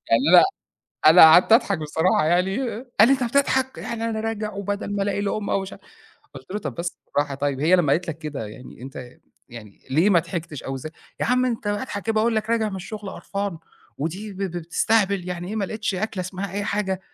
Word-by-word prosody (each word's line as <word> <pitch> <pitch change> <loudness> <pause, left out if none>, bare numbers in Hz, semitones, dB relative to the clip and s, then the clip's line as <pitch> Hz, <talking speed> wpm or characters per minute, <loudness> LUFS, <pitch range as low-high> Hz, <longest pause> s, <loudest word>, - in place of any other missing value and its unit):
يعني 115 +1 +5 0.2
أنا - - +9 0.6
أنا 160 +3 +9
قعدت 160 +7 +8
أضحك 200 -6 +4
بصراحة 160 +4 +1
يعني 170 - +3 0.6
قال 215 - +8
لي: - - +5
"أنت 260 -2 +1
بتضحك 265 +1 +1
يعني 230 -1 -4
أنا 220 -1 -2
راجع 215 -1 -3
وبَدل 200 +1 -4
ما 200 - 0
ألاقي 200 0 -1
لقمة 205 +1 -2
ومش" 195 0 -2 0.6
قُلت 130 +3 -12
له: 205 - -2
"طَب - - -5
بس 175 +1 -5
بالراحة 145 -1 -1
طيب 140 -1 -2
هي 175 +5 +5
لمّا 150 -6 +2
قالت 170 +3 0
لك 160 -1 -4
كده 150 -8 -5
يعني 125 +3 -12
أنت 130 -2 -8 0.4
يعني 105 -4 -12
ليه 165 +9 +3
ما 175 - +5
ضحكتش! 165 -4 -5
أو 135 0 -4
ز" 130 - -8 0.3
يا - - +1
عم 250 +1 +2
أنت 230 -3 -3
أضحك 205 0 -3
كده 225 - -1
باقول 220 +1 +2
لك 220 +1 -2
راجع 225 -2 +1
من 195 - -5
الشُغل 205 +1 -7
قرفان 200 -4 -4 0.4
ودي 190 +8 -4
ب - - -13
ب 195 - -2
بتستهبل، 190 +2 +1
يعني 175 0 -5
إيه 215 - -4
ما 200 - 0
لقيتش 215 0 -3
أكلة 195 0 -3
اسمها 185 +1 -5
أي 200 0 -2
حاجة، 190 -3 -1
195 Hz, 215 wpm, -23 LUFS, 160-215 Hz, 0.6 s, أنا